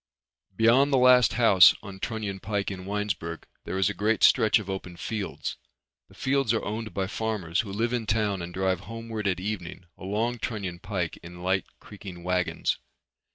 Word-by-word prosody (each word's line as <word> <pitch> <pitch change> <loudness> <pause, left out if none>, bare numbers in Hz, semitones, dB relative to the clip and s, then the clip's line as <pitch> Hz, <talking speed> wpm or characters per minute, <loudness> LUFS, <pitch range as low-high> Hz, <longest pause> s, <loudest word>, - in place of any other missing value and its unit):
Beyond 120 +7 +4
the 135 - +4
last 125 -1 +6
house 105 -7 +7
on 100 -2 -9
Trunion 105 -3 -3
Pike 100 0 -2
in 95 -1 -7
Winesburg 100 -5 -3 0.2
there 95 - -3
is 95 - +3
a 100 - -1
great 105 +3 0
stretch 110 +2 +6
of 105 -4 -6
open 95 -3 -5
fields. 105 0 -4 0.5
The - - -19
fields 135 -4 +1
are - - -2
owned 110 +1 -4
by 95 +2 -1
farmers 100 -4 -2
who 100 - -1
live 115 +4 -1
in 115 -3 -2
town 105 -3 0
and 85 0 -6
drive 95 0 0
homeward 115 0 -5
at 95 -2 0
evening 95 -3 -5
along 110 +5 -1
Trunion 100 -7 -4
Pike 90 -5 -3
in 90 +1 -10
light 95 0 +1
creaking 95 -4 -10
wagons. 90 0 0
100 Hz, 175 wpm, -27 LUFS, 95-110 Hz, 0.5 s, house